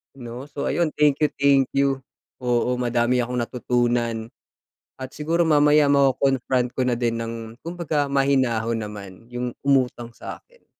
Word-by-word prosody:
'no. 120 0 -8
So 145 -1 -4
ayun, 170 -3 +1
thank 150 0 +3
you, 150 - +4
thank 140 -2 +4
you. 135 -1 +1 0.4
Oo, 125 0 +1
madami 120 0 +1
akong 125 +1 -3
natutunan 120 -1 -1 0.7
at 130 0 -7
siguro 165 +3 +1
mamaya 150 -1 +5
mako-confront 135 -2 +2
ko 130 - 0
na 120 - +1
din 115 -1 0
ng 115 0 -4 0.3
kumbaga 160 -4 -2
mahinahon 130 -5 +1
naman 105 +1 -10
yung 125 0 -3
umutang 130 -4 +1
sa'kin. - - -11
130 Hz, 140 wpm, -23 LUFS, 120-140 Hz, 0.7 s, mamaya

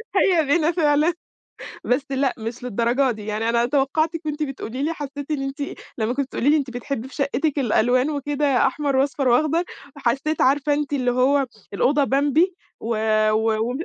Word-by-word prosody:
هيا 355 -4 +4
بنا 315 +3 +2
فعلًا، 310 0 +2 0.7
بس 255 +3 +1
لأ، 270 -1 0
مش 230 +2 -6
للدرجة 245 +3 +1
دي، 215 -2 -6
يعني 215 +1 -2
أنا 235 0 +2
توقعتِك 310 +5 0
وأنتِ 300 0 -3
بتقولي 270 -3 -4
لي 315 +3 0
حسّيت 285 -1 -7
إن 290 -3 -1
أنتِ 275 +2 -4 0.4
لمّا 225 +2 0
كنتِ 275 0 -1
بتقولي 265 +1 0
لي 305 - +5
أنتِ 275 -4 -2
بتحبّي 245 0 -5
في - - -15
شقتِك 280 +1 -1
الألوان 250 +2 +2
وكده 285 -2 +1
أحمر 280 0 -1
وأصفر 270 0 +1
وأخضر، 310 +7 +2 0.3
وحسيت 280 +4 -1
عارفة 285 +2 +3
إن - - -1
أنتِ 295 -1 -3
اللي 255 -3 +1
هو 270 +3 +2 0.3
الأوضة 280 +8 +2
بمبي 290 +7 +2 0.3
و 225 - -6 0.4
و 220 +1 +1
وم 255 - -3
275 Hz, 180 wpm, -22 LUFS, 245-295 Hz, 0.7 s, لي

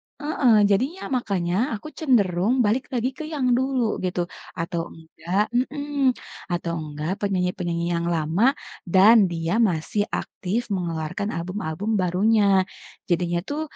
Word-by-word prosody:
heeh, 290 -5 +2 0.2
jadinya 260 - 0
makanya 190 -8 -1 0.2
aku 220 - -11
cenderung 210 - +2
balik 235 +6 +1
lagi 250 +1 0
ke - - -7
yang 280 -5 0
dulu 260 -4 0
gitu 180 -1 -1 0.4
atau 170 0 -2
enggak 165 +4 -2
mmm, 275 +1 0 0.4
atau 175 -1 -2
enggak 155 +4 -4
penyanyi-penyanyi 180 -3 -1
yang 170 0 -1
lama 170 - +2 0.3
dan 195 +4 +6
dia 165 +5 -1
masih 200 0 +1
aktif 220 +4 -3
mengeluarkan 170 +2 -3
album-album 175 +2 -4
barunya, 195 +1 +3 0.4
jadinya 175 0 +1
tuh, 290 +5 -3
195 Hz, 120 wpm, -24 LUFS, 170-245 Hz, 0.4 s, dan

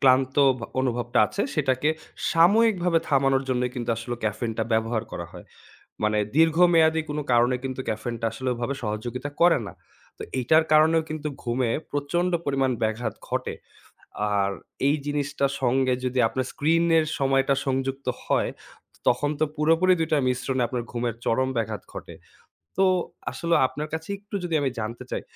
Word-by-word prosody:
ক্লান্ত 130 0 +3 0.2
ব - - -12 0.2
অনুভবটা 120 -1 -1
আছে, 200 - -3
সেটাকে 140 -1 +1 0.4
সাময়িকভাবে 180 0 +4
থামানোর 135 -1 +3
জন্যই 125 -1 0
কিন্তু 120 -2 -3
আসলে 120 +2 -4
ক্যাফেইনটা 110 +1 -2
ব্যবহার 110 0 +1
করা 85 - -5
হয়। - - -11 0.6
মানে 105 0 +2 0.2
দীর্ঘমেয়াদী 165 0 +5
কোন 150 - -3
কারণে 120 +1 +4
কিন্তু 130 -1 -4
ক্যাফেইনটা 115 +2 -3
আসলে 130 +3 -6
ওইভাবে 120 +3 -3
সহযোগিতা 115 +6 -4
করে 175 0 +6
না। - - -9 0.4
তো - - -11 0.2
এইটার 155 +6 +4
কারণেও 160 +1 +5
কিন্তু 155 -1 -4 0.2
ঘুমে 120 0 0 0.2
প্রচণ্ড 170 +5 0
পরিমাণ 135 -2 +1
ব্যাঘাত 110 0 -1
ঘটে। - - -2 0.8
আর 100 -1 +2 0.4
এই 145 - +3
জিনিসটার 145 -1 -1
সঙ্গে 130 +1 +2
যদি 125 0 -1
আপনার 130 +2 -2
স্ক্রিনের 165 +1 +3
সময়টা 135 0 +2
সংযুক্ত 135 0 -2 0.2
হয়, - - +1 0.6
তখন 145 +4 +2
তো - - +5
পুরোপুরি 165 +4 +3
২ 160 -1 0
টার 150 -3 +2
মিশ্রণে 125 +1 -1
আপনার 120 -1 -3
ঘুমের 120 -1 -2
চরম 130 +3 +1
ব্যাঘাত 110 -3 -2
ঘটে। - - -8 0.6
তো 195 - +4 0.5
আসলে 170 0 0
আপনার 150 +3 -5
কাছে 160 +3 -5
একটু 205 +1 -9
যদি 170 -2 -1
আমি 140 - +1
জানতে 110 +2 -5
চাই, - - -2
135 Hz, 150 wpm, -25 LUFS, 120-160 Hz, 0.8 s, করে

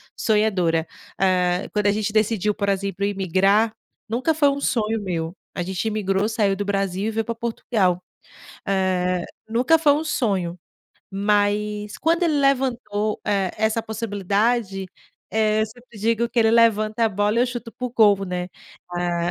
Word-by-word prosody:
sonhadora. 185 -7 +1 0.3
Hã, 180 -1 +2
quando 210 -1 +1
a - - +5
gente 210 0 -2
decidiu, 215 -1 +1
por 200 0 -2
exemplo, 195 0 -2
imigrar, 200 +3 +2 0.3
nunca 255 +8 0
foi 290 -2 +4
um 280 0 -2
sonho 225 -4 0
meu, 170 -3 -3 0.2
a 180 - -2
gente 185 0 -3
imigrou, 205 -1 0
saiu 210 -3 +1
do 205 - -3
Brasil, 195 -1 -1
e - - -1
veio 225 0 -1
para 230 - -2
Portugal. 220 -5 0 0.7
Hã, 185 -2 0 0.2
nunca 250 +8 +3
foi 305 -2 +4
um 305 +2 -1
sonho, 195 - -1 0.5
mas 205 +1 0
quando 335 +2 +1
ele 315 -4 +2
levantou, 250 -6 0
eh, 195 -3 +1
essa 220 +1 +1
possibilidade, 205 -1 -1 0.5
eh, 215 0 +2
eu - - 0
sempre 235 0 -15
digo 230 +2 +1
que 245 - -3
ele 225 -1 +5
levanta 225 -1 +3
a - - +3
bola 205 +2 0
e - - +5
eu - - +2
chuto 240 -2 -6
para 250 - -4
o - - -7
gol, 205 -4 +4
né. 180 -1 -4 0.4
Ah 175 -1 -1
210 Hz, 165 wpm, -22 LUFS, 195-230 Hz, 0.7 s, a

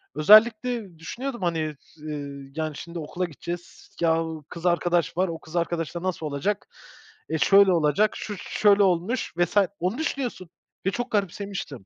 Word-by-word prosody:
özellikle 215 +1 +5
düşünüyordum, 240 +8 -5
hani, 160 -4 -1 0.2
eee, 140 -3 -7
"Yani 155 -2 -2
şimdi 170 +3 -7
okula 175 +4 -3
gideceğiz. 175 +2 -8
Yahu 160 -2 0
kız 170 0 -8
arkadaş 175 -1 +1
var, 185 +1 +3
o 165 -2 -5
kız 160 +1 -13
arkadaşla 170 0 -2
nasıl 185 -4 -2
olacak 150 +8 -2 0.6
e, 160 - 0
şöyle 195 +3 +6
olacak, 165 +6 +3
şu 210 - -5
şöyle 205 +2 +3
olmuş 185 +6 0
vs." 175 +3 +1 0.2
Onu 185 +7 -1
düşünüyorsun 260 - -3 0.4
ve 195 - +2
çok 245 +6 -4
garipsemiştim. 195 - -3
175 Hz, 145 wpm, -25 LUFS, 160-200 Hz, 0.6 s, şöyle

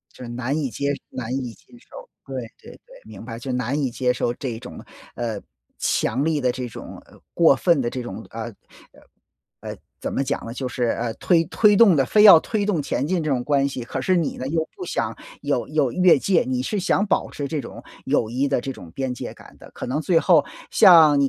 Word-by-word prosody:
就 - - -10
是 120 - -7
难 125 +5 -2
以 140 -4 -1
接 140 +6 -2 0.2
难 120 -1 -6
以 125 -3 -3
接 - - -24
受， - - -13 0.2
对 - - -5
对 - - -12
对， - - -16 0.2
明 - - -11
白。 115 -1 -7
就 130 +2 -5
难 125 +2 -1
以 130 - -1
接 125 +1 0
受 120 -1 -1
这 120 -3 -5
种， 125 - -10 0.3
呃， 115 -4 -3 0.4
强 130 +6 0
力 160 -1 +1
的 125 -3 0
这 125 -1 -5
种， - - -10
呃， - - -20
过 165 -4 +5
分 145 +1 +2
的 120 - -1
这 125 - -5
种， 120 -2 -8
呃 115 0 -6 0.5
呃 - - -19 0.6
呃， - - -7 0.2
怎 - - -4
么 135 - 0
讲 140 +1 -3
呢？ 115 - -6
就 130 +1 -4
是， 125 0 -2
呃， 115 0 -2
推 170 +4 +2
推 210 +3 +4
动 200 -6 +6
的 135 - +3
非 210 +10 +3
要 195 -6 +10
推 205 +4 -2
动 175 -8 0
前 140 - -2
进 175 -1 0
这 155 - -2
种 130 -3 0
关 140 -1 +2
系， 135 -3 -5
可 130 +2 -5
是 185 - +2
你 170 -4 0
呢 130 - -5
又 160 +1 -1
不 370 - -6
想 - - -3 0.2
有 - - -1
有 - - +1
越 180 -5 +5
界， 185 +1 +2
你 130 -1 -1
是 205 +10 -2
想 200 +2 +1
保 - - 0
持 140 -1 -5
这 155 - -2
种 - - -10 0.2
友 110 - +1
谊 130 +5 0
的 135 -3 0
这 135 - -5
种 85 - -12
边 130 -2 -3
界 - - -7
感 - - -16
的。 - - -14
可 - - -7
能 140 +5 -2
最 165 0 +3
后 160 -6 +4 0.3
像 160 -5 +7
你 140 - +3
135 Hz, 255 characters per minute, -22 LUFS, 125-165 Hz, 0.6 s, 要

